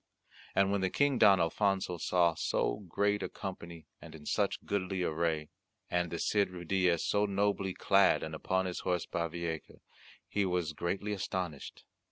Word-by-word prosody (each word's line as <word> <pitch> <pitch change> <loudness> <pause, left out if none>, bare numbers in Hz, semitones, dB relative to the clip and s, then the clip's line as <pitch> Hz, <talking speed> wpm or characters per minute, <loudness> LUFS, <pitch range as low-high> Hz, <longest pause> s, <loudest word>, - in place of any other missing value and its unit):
And 100 0 +3
when 100 -1 +1
the 95 - +1
King 140 +3 +2
Don 100 -3 +7
Alfonso 95 +1 0
saw 85 0 +3
so - - 0
great 105 +3 +1
a - - -3
company 85 -4 -7 0.2
and - - -11
in 75 -2 -12
such - - 0
goodly 95 -2 -1
array, 80 -2 -1 0.4
and 90 -1 +1
the 85 - -4
Cid 100 +2 +1
Ruydiez 90 -1 0
so 105 0 +2
nobly 100 -1 0
clad 100 0 +4
and 80 - -5
upon 95 +4 0
his 90 -1 -3
horse 90 -2 -1
Bavieca, 85 -1 -4 0.5
he 100 - 0
was 90 -4 -1
greatly 95 +6 -2
astonished. 90 -6 -4
90 Hz, 160 wpm, -32 LUFS, 85-100 Hz, 0.5 s, Don